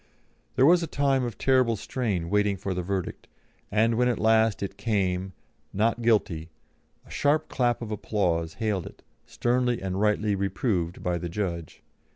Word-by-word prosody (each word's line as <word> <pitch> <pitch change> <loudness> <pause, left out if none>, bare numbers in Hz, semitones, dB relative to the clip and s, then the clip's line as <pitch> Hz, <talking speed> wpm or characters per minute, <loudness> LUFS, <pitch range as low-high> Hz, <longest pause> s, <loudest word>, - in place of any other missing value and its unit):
There 130 - +5
was 175 +3 +6
a 165 - -2
time 140 -3 +1
of 120 -4 -5
terrible 130 -3 +3
strain 100 -7 -3
waiting 105 -1 +2
for 95 +1 -3
the 90 - -2
verdict, 95 0 -4 0.4
and 110 +2 +2
when 125 - +3
at 120 -3 +1
last 110 -1 +3
it 100 - -5
came, 95 -4 -1 0.4
"Not 115 +4 +1
Guilty," 95 -8 +1 0.6
a - - -16
sharp 145 +2 +1
clap 120 -2 0
of 110 - -6
applause 85 -6 -1
hailed 105 -5 -2
it, - - -14 0.2
sternly 125 0 0
and 95 0 -3
rightly 105 0 +2
reproved 95 -3 -1
by 90 -1 0
the 85 - -4
judge. 85 -3 -4
105 Hz, 165 wpm, -26 LUFS, 95-120 Hz, 0.6 s, was